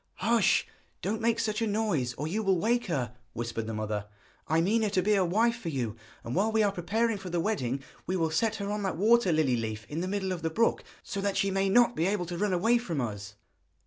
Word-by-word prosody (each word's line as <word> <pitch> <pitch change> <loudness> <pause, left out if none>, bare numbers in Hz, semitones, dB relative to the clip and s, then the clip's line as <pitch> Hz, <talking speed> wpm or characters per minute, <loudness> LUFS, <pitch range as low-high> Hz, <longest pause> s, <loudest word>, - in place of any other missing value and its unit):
'Hush; 225 0 +3 0.4
don't 215 +4 -1
make 230 0 +2
such 215 +1 -1
a 225 - +1
noise 200 - 0
or 150 +5 -3
you 205 +7 -1
will 195 -3 +2
wake 240 +5 +1
her!' 130 - -2 0.2
whispered 115 -1 -4
the 115 - -3
mother. 105 -1 -3 0.4
'I 160 +2 +3
mean 215 +6 +2
her 215 - +1
to 185 -2 +1
be 210 +2 +3
a 195 -2 +3
wife 225 +7 +2
for 185 -8 -5
you, 120 -7 -2 0.3
and 115 - -5
while 210 +5 +2
we 220 0 +3
are 205 - +2
preparing 215 +4 0
for 190 -1 -7
the 175 0 -1
wedding 140 - -1 0.2
we 185 +2 0
will 165 -2 0
set 220 +7 +1
her 200 -1 -3
on 210 0 -2
that 190 -5 -2
water 220 0 +4
lily 155 -6 +2
leaf 110 -1 -4
in 155 +3 -3
the 185 - -2
middle 190 -1 -2
of 180 -2 -3
the 160 - 0
brook, 230 +8 +1 0.2
so 200 - -4
that 200 0 0
she 195 - +1
may 195 0 +1
not 240 +4 +4
be 165 +3 +1
able 195 -2 0
to 175 0 -5
run 205 -1 +1
away 225 +7 +3
from 170 -10 -3
us.' 105 -4 -4
190 Hz, 250 wpm, -29 LUFS, 155-215 Hz, 0.4 s, water